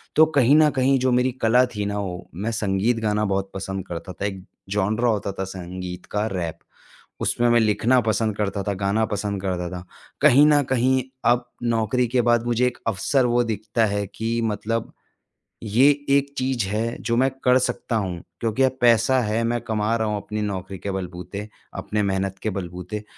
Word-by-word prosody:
तो 160 - +7
कहीं 140 +1 +5
न 155 -1 +6
कहीं 135 +1 +3
जो 130 0 +1
मेरी 125 +1 +2
कला 125 +3 +5
थी 105 -1 -2
ना 100 0 -2
वो। 90 -3 -5
मैं 115 - -1
संगीत 105 +2 0
गाना 105 -1 0
बहुत 95 -1 -1
पसंद 95 -1 -4
करता 85 +2 -6
था। 100 - -4
एक 95 -2 -4 0.3
जॉनर 105 +3 0
होता 105 -4 +1
था 95 0 -4
संगीत 90 -1 -7
का, 105 +1 -2
रैप। 85 -4 -4 0.6
उसमें 120 0 +1
मैं 120 0 +5
लिखना 110 +3 +3
पसंद 110 -1 0
करता 100 -1 -1
था, 100 - -1
गाना 100 +3 0
पसंद 100 -2 -3
करता 90 -2 -2
था। 90 -1 -7 0.4
कहीं 145 0 +7
न 150 -1 +5
कहीं, 130 0 +2 0.2
अब 120 0 +2
नौकरी 120 +2 +1
के 125 +1 +2
बाद 120 0 +3
मुझे 120 +1 +2
एक 125 - -4
अवसर 120 +5 +1
वो 120 0 +2
दिखता 110 0 0
है 100 -1 -1
कि 115 +1 -1
मतलब 115 +2 -3 0.7
ये 115 +5 +4 0.3
एक 140 0 -1
चीज़ 130 -5 0
है, 110 +3 -2
जो 115 0 0
मैं 130 +2 +3
कर 125 0 +5
सकता 125 -2 -2
हूँ। 95 -5 -3 0.2
क्योंकि 115 +3 0
अब 130 0 +2
पैसा 120 +2 +4
है, 110 0 0
मैं 120 +1 0
कमा 110 -1 -1
रहा 110 -1 -1
हूँ 105 - -1
अपनी 105 0 -4
नौकरी 95 -2 -4
के 100 - -4
बलबूते, 95 +2 -6 0.3
अपने 100 +2 -2
मेहनत 95 -1 -1
के 110 - 0
बलबूते। 90 +4 -6
110 Hz, 190 wpm, -23 LUFS, 100-120 Hz, 0.7 s, तो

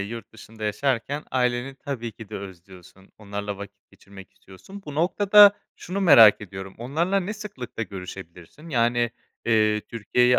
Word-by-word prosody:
yurt 110 +2 -7
dışında 110 0 -11
yaşarken 135 +5 -1
aileni 125 +1 -1
tabii 120 -5 -6
ki 110 -2 -12
de - - -6
özlüyorsun, 95 0 -13
onlarla 100 -1 -5
vakit 100 0 -12
geçirmek 95 -1 -15
istiyorsun. 95 - -14
Bu 145 - -7
noktada 200 +5 +6 0.2
şunu 190 +3 -5
merak 140 - +8
ediyorum, 95 -1 -9
onlarla 165 +11 0
ne 190 +3 -4
sıklıkla 160 - -7
görüşebilirsin? 95 - -10
Yani, 120 -3 +1 0.3
eee, 110 -2 +2
Türkiye'yi 125 +3 +1
115 Hz, 140 wpm, -24 LUFS, 100-140 Hz, 0.3 s, merak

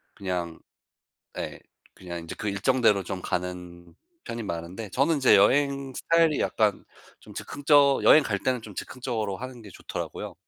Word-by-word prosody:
그냥 90 -3 -4 0.8
예. - - -5 0.4
그냥 85 -2 -8
이제 - - -7
그 105 - -3
일정대로 105 0 +2
좀 95 0 -5
가는 90 -1 -5 0.3
편이 115 0 -5
많은데 90 +5 -5
저는 145 - +2
이제 125 -6 +6
여행 140 +4 +2
스타일이 165 -2 +2
약간 105 -3 +1 0.4
좀 - - -14
즉흥적 145 -1 +3
여행 155 - +8
갈 100 -6 -1
때는 125 -1 -1
좀 105 -3 -11
즉흥적으로 110 -6 -4
하는 130 -1 -8
게 105 - -12
좋더라고요. - - -6
110 Hz, 315 characters per minute, -26 LUFS, 90-135 Hz, 0.8 s, 여행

